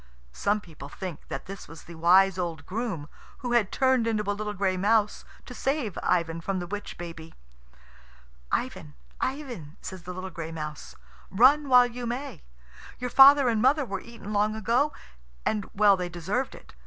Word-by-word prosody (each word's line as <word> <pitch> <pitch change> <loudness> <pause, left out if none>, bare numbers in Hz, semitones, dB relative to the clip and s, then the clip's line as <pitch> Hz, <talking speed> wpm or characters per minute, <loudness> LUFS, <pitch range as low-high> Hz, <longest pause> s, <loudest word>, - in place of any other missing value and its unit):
Some 205 - 0
people 155 -6 -11
think 180 -1 -7
that - - -5
this 195 0 -9
was 165 +1 -12
the 170 - -11
wise 185 +3 +4
old 165 -5 -3
groom, 195 -8 -4 0.4
who 245 - -1
had 235 -5 +2
turned 260 -3 +2
into 215 -2 0
a 205 - +1
little 210 0 -4
gray 190 -1 +1
mouse 210 +2 +1 0.2
to 250 - -9
save 265 - -1
Ivan 165 -2 0
from 195 +3 -2
the 175 - -3
witch 205 +3 -6
baby. 165 -2 -9 1.2
"Ivan, 75 -1 -3 0.2
Ivan," 245 - -4
says 185 -1 -8
the 180 - -7
little 185 +1 -6
gray 165 -1 -6
mouse, 155 -2 -7 0.3
"run 270 +8 +5
while 250 -1 +8
you 245 0 -5
may. 250 - -5 0.6
Your 250 -1 -4
father 275 +1 +8
and 225 -3 +2
mother 275 +4 +3
were 195 -4 -4
eaten 230 -3 -9
long 210 +1 +1
ago, 235 +7 +1 0.5
and 210 -2 -1
well 205 -1 +6
they 180 -1 -4
deserved 190 +10 -3
it. - - -15
205 Hz, 175 wpm, -27 LUFS, 175-240 Hz, 1.2 s, while